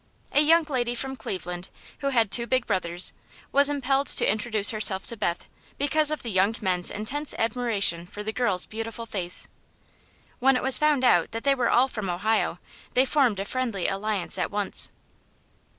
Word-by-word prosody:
A 290 - +4
young 330 +2 +4
lady 245 -5 -2
from 265 +2 -4
Cleveland, 180 -5 -6 0.3
who 275 - -1
had 230 -6 +1
two 235 -1 +3
big 255 0 0
brothers, 175 -3 0 0.4
was 280 +1 +5
impelled 275 -1 0
to - - +4
introduce 215 0 +3
herself 210 -3 +1
to 235 - -1
Beth 175 -5 -3 0.3
because 300 +1 +2
of 305 - -3
the 230 - -4
young 195 +3 +1
men's 180 -4 +1
intense 275 +8 -1
admiration 220 -7 +1
for 205 +2 -8
the 220 +1 -4
girl's 200 -8 0
beautiful 225 +1 -6
face. 185 -5 -2 0.9
When 270 +1 +3
it - - -4
was 265 0 +6
found 300 -3 +2
that 175 -9 +3
they 280 - +3
were 250 -3 0
all 255 +2 +4
from 215 -7 -5
Ohio, 215 +6 -1 0.4
they 255 +1 +4
formed 255 -7 +1
a 195 - -3
friendly 230 -7 -2
alliance 200 0 -1
at - - -1
once. 205 -1 -1
225 Hz, 175 wpm, -25 LUFS, 195-265 Hz, 0.9 s, was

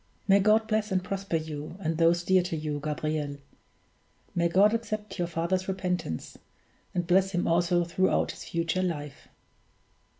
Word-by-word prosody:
May 195 0 +6
God 215 +2 +4
bless 215 -1 0
and 185 -1 +1
prosper 195 -1 -3
you, 155 +1 -4
and 165 -3 -1
those 170 +1 +4
dear 185 +1 +4
to 175 -2 -3
you, 150 -1 -3
Gabriel! 150 -1 -2 1.0
May 170 -1 +2
God 200 +5 +5
accept 215 -3 -3
your 175 - 0
father's 175 +3 -1
repentance, 180 - -3 0.6
and 175 -1 0
bless 190 +2 +3
him 175 - 0
also 175 +1 +3
throughout 175 +2 +1
his - - -10
future 170 +2 -1
life!" 150 -6 -4
175 Hz, 155 wpm, -28 LUFS, 165-190 Hz, 1.0 s, May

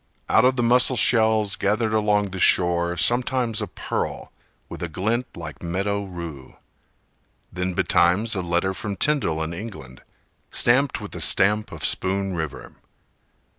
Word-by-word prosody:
Out 110 - +4
of 130 0 +3
the 120 - 0
mussel 125 +2 +3
shells 110 -4 +3
gathered 110 +2 0
along 105 -2 +1
the 95 - -6
shore 85 -1 +3
Sometimes 120 - +1
a 105 - -3
pearl - - -4 0.4
with - - -9
a 85 - -3
glint 110 +9 -1
like 75 -6 -8
meadow 100 +4 -2
rue: 85 -7 -9 1.0
Then 90 0 -3
betimes 95 +8 +2
a 95 - -1
letter 90 +2 0
from 100 +1 -5
Tyndall 95 - 0
in 80 +1 -5
England, 85 - -9 0.5
Stamped 130 +3 +2
with - - -8
the - - -6
stamp 105 +2 +2
of - - -4
Spoon 95 0 -1
River. 80 -5 -6
100 Hz, 145 wpm, -23 LUFS, 85-110 Hz, 1.0 s, Out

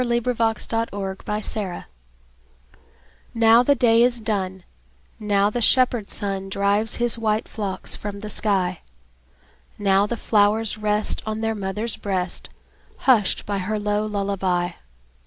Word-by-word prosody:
Louisa 240 0 0
May 230 - +2
Alcott 225 +1 -2
Lullaby 200 0 -3 1.5
NOW 230 +1 +6
the 280 +3 +3
day 230 -3 +4
is 240 0 +3
done, 190 -4 -3 0.6
Now 205 -1 +1
the 240 - -2
shepherd 240 -2 +3
sun 195 -1 -1
Drives 200 +3 +1
his 240 -1 +1
white 215 -1 0
flocks 200 -3 -3
from 200 -1 -6
the 215 - -6
sky; 190 -5 0 1.0
Now 200 0 +2
the 235 - -3
flowers 215 0 +2
rest 210 0 0
On 215 0 -3
their 225 0 0
mother's 210 +2 -2
breast, 185 -3 -3 0.6
Hushed 230 -7 +3
by 200 -1 -2
her 210 +4 -2
low 210 0 -1
lullaby. 195 -4 -1
210 Hz, 130 wpm, -22 LUFS, 195-225 Hz, 1.5 s, NOW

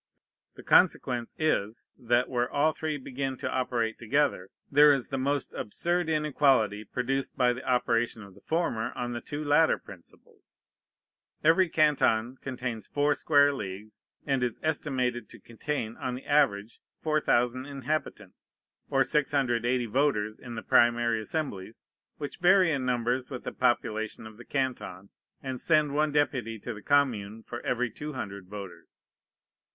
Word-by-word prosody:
The - - -12
consequence 120 -2 +2
is, 115 -9 -1
that, 120 +1 +1
where 120 -1 -1
all 150 +2 +2
three 155 -1 -3
begin 135 0 -4
to - - -4
operate 120 -3 -1
together, 120 -6 0 0.2
there 145 +1 +7
is 135 -4 0
the 135 - -2
most 140 +1 -1
absurd 175 +9 -1
inequality 135 -9 +2
produced 130 +5 -3
by 125 -1 +3
the 125 - -8
operation 120 -3 0
of 100 -1 -13
the 100 - -18
former 155 -9 -1
on 120 0 -4
the 120 - -4
two 145 +1 -5
latter 150 +2 +4
principles. 90 -3 -17 0.9
Every 165 +3 +4
canton 135 -6 +2
contains 125 -4 -5
four 145 0 +2
square 145 0 +4
leagues, 105 -3 -7 0.2
and 135 -2 0
is 120 -2 -2
estimated 130 -7 -1
to - - -14
contain, 115 -1 -4
on 125 -1 -3
the 130 - -9
average, 120 -8 +1 0.2
4,000 130 -4 +1
inhabitants, 135 -8 -5 0.3
or 135 -1 +3
680 130 -4 +1
voters 110 -3 0
in 120 -2 -8
the - - -6
primary 120 -1 +3
assemblies, 110 - -5 0.3
which 145 -2 -6
vary 180 -1 +5
in 135 -4 -1
numbers 125 +1 0
with 130 -3 -6
the - - -4
population 110 -2 -1
of 110 -1 -11
the 120 - -12
canton, 125 -8 -3 0.3
and 130 -2 -5
send 155 -3 +3
one 150 +1 +1
deputy 130 -6 0
to 120 +3 -6
the 105 - -10
commune 115 -7 +1
for 120 - -7
every 125 -1 -1
200 105 -9 -6
voters. 100 -2 -10
125 Hz, 145 wpm, -28 LUFS, 115-145 Hz, 0.9 s, there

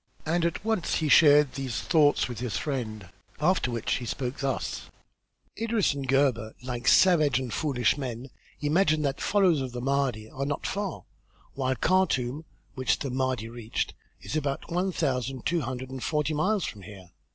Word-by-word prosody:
And 170 +2 +1
at 170 +5 -2
once 220 -6 0
he 155 -2 0
shared 145 -2 +6
these 130 -3 -3
thoughts 150 -3 +3
with 120 -3 -6
his 115 -4 -2
friend, 110 - -4 0.3
after 170 -4 +2
which 115 -2 -1
he 120 - -6
spoke 130 +3 -3
thus: 135 -2 -3 0.7
"Idris 225 -6 +1
and 140 -1 -5
Gebhr, 130 -5 +1
like 125 -1 -4
savage 155 -8 +5
and 130 -2 -3
foolish 125 -8 +1
men, 125 -1 -5 0.3
imagine 155 0 +2
that 140 -2 -1
followers 185 -8 +3
of 130 -2 -5
the 125 - -4
Mahdi 130 -4 0
are 135 +4 -5
not 145 - -3
far, 200 -3 -3 0.5
while 130 -1 -1
Khartûm, 150 -3 +1 0.3
which 130 -1 +1
the 135 - -4
Mahdi 130 -3 -1
reached, 115 -1 -4 0.3
is - - -5
about 145 0 -2
one 180 +3 0
thousand 130 -5 -2
two 170 +1 +1
hundred 130 0 -5
and 130 -1 -6
forty 150 0 0
miles 190 +5 +1
from 105 - -7
here. 95 -2 -12
135 Hz, 170 wpm, -27 LUFS, 125-155 Hz, 0.7 s, shared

